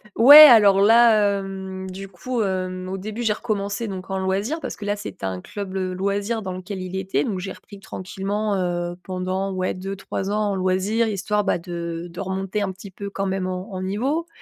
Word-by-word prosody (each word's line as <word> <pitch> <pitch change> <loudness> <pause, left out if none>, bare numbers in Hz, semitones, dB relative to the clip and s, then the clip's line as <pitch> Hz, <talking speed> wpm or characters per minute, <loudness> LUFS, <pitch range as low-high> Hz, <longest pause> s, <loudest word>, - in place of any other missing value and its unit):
Ouais, 275 +6 +10
alors 210 -9 +8
là, 215 -2 +5
hem, 190 -1 -6
du 195 +1 -7
coup, 220 +6 -3
hem, 185 -1 -3
au 190 0 -4
début, 215 +4 -5
j'ai 215 -2 +2
recommencé 205 0 -3
donc 190 0 -7
en 190 - -1
loisir 200 - -1
parce - - -5
que 205 - -8
là, 205 0 0
c'était 205 - -7
un 95 -1 -3
club, 195 -2 -7
heu, 185 -1 -2
loisir 200 +3 -1
dans 185 - -4
lequel 185 +1 -6
il 185 +1 -6
était. 190 -7 -1
Donc 195 -4 -3
j'ai 190 +1 -5
repris 200 -1 -13
tranquillement, 200 +2 -3
heu, 175 -1 -2
pendant 185 +1 -3
ouais 185 0 -1
2-3 195 +1 -5
ans 210 0 0
en - - -1
loisir, 190 +5 +1
histoire, 210 0 -1
bah, 195 - +1
de 170 0 -6
de 175 - -10
remonter 190 +2 -3
un 195 -2 -1
petit 190 +1 -11
peu 200 +2 -7
quand 195 0 -3
même 190 -1 -2
en 185 +2 -5
en 185 - -4
niveau. 265 - -1
195 Hz, 210 wpm, -22 LUFS, 185-210 Hz, -, Ouais